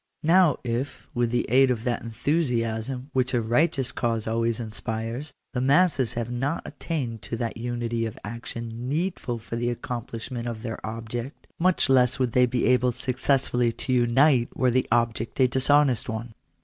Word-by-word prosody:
Now 170 -1 +5
if, 125 +3 -3
with 120 -1 +1
the 120 +1 0
aid 130 +2 +5
of 120 -3 -1
that 120 -1 -1
enthusiasm 125 0 -1
which 130 -1 +1
a - - +3
righteous 125 +4 +1
cause 115 -2 -1
always 115 +1 0
inspires, 115 +4 -4 0.2
the 125 - -1
masses 140 -2 +3
have 120 0 -3
not 135 +6 -2
attained 125 -10 -4
to 115 - -4
that 115 0 -3
unity 120 -1 -2
of 110 - -8
action 115 +2 -6
needful 155 -5 -2
for 115 +1 -6
the 120 +1 0
ac 120 - -4
complishment 120 0 -5
of 115 -1 -5
their 115 -2 -5
object, 115 +4 -5
much 185 -1 +3
less 130 -2 +4
would 130 -3 0
they 125 +1 +4
be 125 0 0
able 125 0 +3
successftilly 125 -1 0
to 130 - -2
unite 125 +1 +4
were 130 -1 +3
that 130 +2 +1
object 115 0 0
a 130 - +6
dishonest 135 0 +3
one. 110 +1 -5
120 Hz, 170 wpm, -26 LUFS, 115-130 Hz, 0.2 s, a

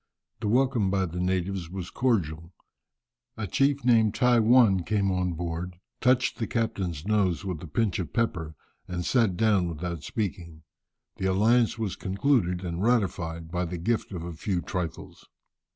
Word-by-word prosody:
The - - -3
welcome 125 -3 +2
by 95 0 +1
the 90 +1 -5
natives 90 -1 -1
was 90 -1 -6
cordial. 85 - -1 0.8
A 110 - -3
chief 135 +7 +1
named 115 -4 +4
Tai 125 -2 +4
One 110 -4 +5
came 100 +1 0
on 90 -1 0
board, 85 +1 -4 0.2
touched 125 0 +2
the 115 - -1
captain's 95 -8 -2
nose 100 -5 +1
with 90 -5 -4
a 85 - -8
pinch 105 +6 0
of 90 - -4
pepper, 90 -10 -1 0.3
and 90 -1 -4
sat 115 -8 +2
down 105 -5 +3
without 85 0 -4
speaking. 85 -7 -4 0.5
The 95 - -1
alliance 115 +5 +3
was 110 -5 -2
concluded 95 -3 0
and 85 0 -3
ratified 85 -8 0
by 90 0 -1
the 90 +1 -5
gift 110 +7 -1
of 90 -4 -5
a 85 0 -6
few 90 +3 -2
trifles. 90 -2 -6
95 Hz, 160 wpm, -27 LUFS, 85-115 Hz, 0.8 s, One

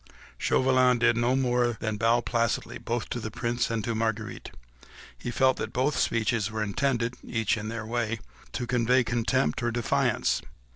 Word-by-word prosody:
Chauvelin 130 -1 +3
did 115 0 +3
no 120 +2 +2
more 125 -3 +1
than 110 -1 -2
bow 115 +3 +3
placidly 115 -2 -1
both - - -3
to - - -3
the - - -4
Prince 120 +1 -1
and 115 -2 -1
to 115 - -1
Marguerite; 110 -1 -2 0.7
he - - -6
felt 130 +1 +3
that 110 - -4
both 130 +3 +1
speeches 115 -3 +1
were 110 0 -2
intended—each 115 -1 -1
in 105 -1 -5
their 115 -1 -4
way—to 115 - -4
convey 125 +1 +3
contempt 120 +3 0
or 120 - +1
defiance. 120 -1 +1
120 Hz, 155 wpm, -27 LUFS, 115-125 Hz, 0.7 s, Chauvelin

